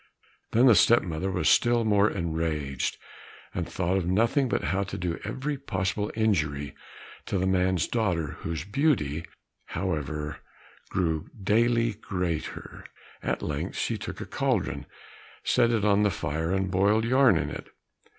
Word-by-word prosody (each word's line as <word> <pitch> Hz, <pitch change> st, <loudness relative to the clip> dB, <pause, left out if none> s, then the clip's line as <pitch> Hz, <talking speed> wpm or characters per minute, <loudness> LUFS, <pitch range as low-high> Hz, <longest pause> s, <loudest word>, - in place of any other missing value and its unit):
Then 120 Hz, +3 st, +5 dB
the 125 Hz, -, +8 dB
step 120 Hz, +3 st, +5 dB
mother 85 Hz, +2 st, -3 dB
was 95 Hz, -, 0 dB
still 120 Hz, -1 st, +4 dB
more 105 Hz, -1 st, +4 dB
enraged, 80 Hz, -6 st, -2 dB, 0.6 s
and -, -, -3 dB
thought 90 Hz, +1 st, 0 dB
of 90 Hz, -3 st, -1 dB
nothing 115 Hz, +8 st, +2 dB
but -, -, 0 dB
how 95 Hz, +7 st, 0 dB
to 100 Hz, 0 st, -4 dB
do 90 Hz, -2 st, -2 dB
every 140 Hz, +1 st, -3 dB
possible 100 Hz, -4 st, -2 dB
injury 75 Hz, -10 st, 0 dB, 0.5 s
to 100 Hz, -, 0 dB
the 95 Hz, -, 0 dB
man's 95 Hz, -2 st, +2 dB
daughter, 90 Hz, -, -1 dB
whose 80 Hz, -3 st, -4 dB
beauty, 100 Hz, -, +1 dB, 0.4 s
however, 75 Hz, -4 st, -3 dB, 0.5 s
grew 80 Hz, -4 st, -1 dB
daily 115 Hz, +3 st, +2 dB
greater. 90 Hz, -6 st, -4 dB, 0.4 s
At -, -, -2 dB
length 75 Hz, -1 st, -3 dB
she -, -, -1 dB
took -, -, -6 dB
a -, -, -5 dB
cauldron, 70 Hz, +1 st, -1 dB, 0.6 s
set 120 Hz, -, +3 dB
it 110 Hz, -3 st, +1 dB
on 105 Hz, 0 st, +4 dB
the 105 Hz, -, +4 dB
fire, 80 Hz, -1 st, -2 dB
and 95 Hz, 0 st, 0 dB
boiled 100 Hz, +4 st, +3 dB
yarn 130 Hz, +1 st, +5 dB
in -, -, -2 dB
it. -, -, -7 dB
95 Hz, 150 wpm, -27 LUFS, 80-110 Hz, 0.6 s, the